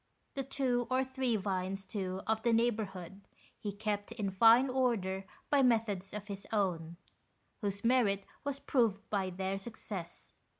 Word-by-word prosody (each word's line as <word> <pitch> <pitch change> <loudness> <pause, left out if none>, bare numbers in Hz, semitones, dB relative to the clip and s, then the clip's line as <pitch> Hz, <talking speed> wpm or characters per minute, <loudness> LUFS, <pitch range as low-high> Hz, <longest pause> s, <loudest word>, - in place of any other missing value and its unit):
The 275 - -2
two 255 -3 0
or 260 0 +3
three 260 -2 0
vines, 195 -1 -2
too, 190 -1 -3
of 220 0 +1
the 235 - +2
neighbourhood, 205 -5 0 0.4
he 205 - -3
kept 205 +1 -2
in 210 -4 -2
fine 230 +7 +7
order 225 -8 0 0.3
by 285 -1 +5
methods 220 -6 +2
of 210 -1 -5
his 200 -1 -7
own, 170 -6 0 0.6
whose 200 -2 -3
merit 215 -6 +3 0.2
was 285 -1 -2
proved 230 -8 +1
by 195 -3 +1
their 190 +1 -2
success. 195 -5 -7
210 Hz, 145 wpm, -33 LUFS, 195-240 Hz, 0.6 s, fine